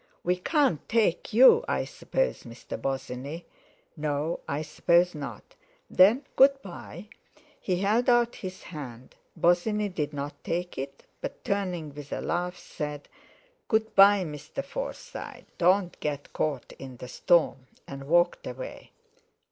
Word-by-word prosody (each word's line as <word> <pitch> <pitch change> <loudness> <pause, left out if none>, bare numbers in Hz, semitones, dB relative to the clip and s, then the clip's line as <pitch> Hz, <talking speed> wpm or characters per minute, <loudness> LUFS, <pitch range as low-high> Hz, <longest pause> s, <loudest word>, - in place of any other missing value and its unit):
We 180 +1 +1
can't 260 - +1
take 215 -6 +1
you, 265 - +7
I - - 0
suppose, - - -2
Mr. - - -8
Bosinney? 135 +4 -4 0.5
No, 150 +1 -1
I 145 +2 -2
suppose 170 +3 +3
not. 145 -3 -8 0.4
Then, 220 +9 +5
good 275 +1 +6
bye!" 185 +1 -9 0.5
He 180 -1 -1
held 220 +5 +2
out 240 -1 +3
his 185 -1 -7
hand. 130 -7 -9 0.2
Bosinney 205 +5 +2
did 150 -6 -3
not 145 0 -6
take 175 +1 -2
it, 135 +1 -6 0.2
but, - - -6
turning 180 -7 -2
with 145 -1 -10
a - - -2
laugh, 180 +1 -2
said: 150 -1 -6 0.6
"Good 220 0 +1
bye, 195 0 +7
Mr. 150 - -6
Forsyte. - - -7
Don't 180 +1 +3
get 145 -1 -4
caught 145 -5 -2
in 130 -2 -9
the 125 - -8
storm!" 145 -2 +2 0.2
and 135 0 -8
walked 175 +2 +2
away. 130 +1 -8
175 Hz, 135 wpm, -28 LUFS, 145-200 Hz, 0.6 s, you